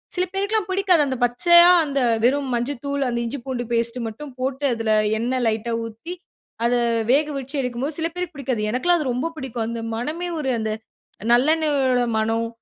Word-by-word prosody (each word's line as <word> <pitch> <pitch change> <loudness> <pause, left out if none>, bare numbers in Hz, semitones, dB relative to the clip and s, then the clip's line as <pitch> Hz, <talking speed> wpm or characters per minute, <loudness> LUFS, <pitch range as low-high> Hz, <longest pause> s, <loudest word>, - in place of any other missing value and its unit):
சில 360 - +1
பேருக்குலாம் 400 0 -1
பிடிக்காது. 375 -4 +3
அந்த 260 - -2
பச்சையா 345 +8 +6 0.2
அந்த 280 -1 -1 0.2
வெறும் 270 +2 +2
மஞ்சள் 240 +2 -2
தூள் 280 0 -1
அந்த 235 0 -1
இஞ்சி 265 +5 -4
பூண்டு 255 -2 -3
பேஸ்ட் 235 +1 -1
மட்டும் 265 +5 -8
போட்டு, 265 +2 -2
அதில 225 -1 -1 0.3
எண்ணை 255 +2 0
லைட்டா 225 +1 -1
ஊத்தி, 230 +10 -8 0.5
அத 240 - +2 0.4
வேக 295 +3 +3
வெச்சு 270 +2 -8
எடுக்கும்போது, 255 +5 -3
சில 325 - 0
பேருக்கு 360 -3 -4
பிடிக்காது. 255 -5 -2
எனக்கெல்லாம் 345 +8 +2
அது 260 -4 -1
ரொம்ப 265 +7 -2
பிடிக்கும். 240 -4 -4
அந்த 235 -1 -4
மணமே 315 +9 -3
ஒரு 265 -3 -1
அந்த 220 0 -2 0.6
நல்லெண்ணெயோட 275 -2 +3 0.2
மணம். 225 +1 0
265 Hz, 170 wpm, -22 LUFS, 235-310 Hz, 0.6 s, பச்சையா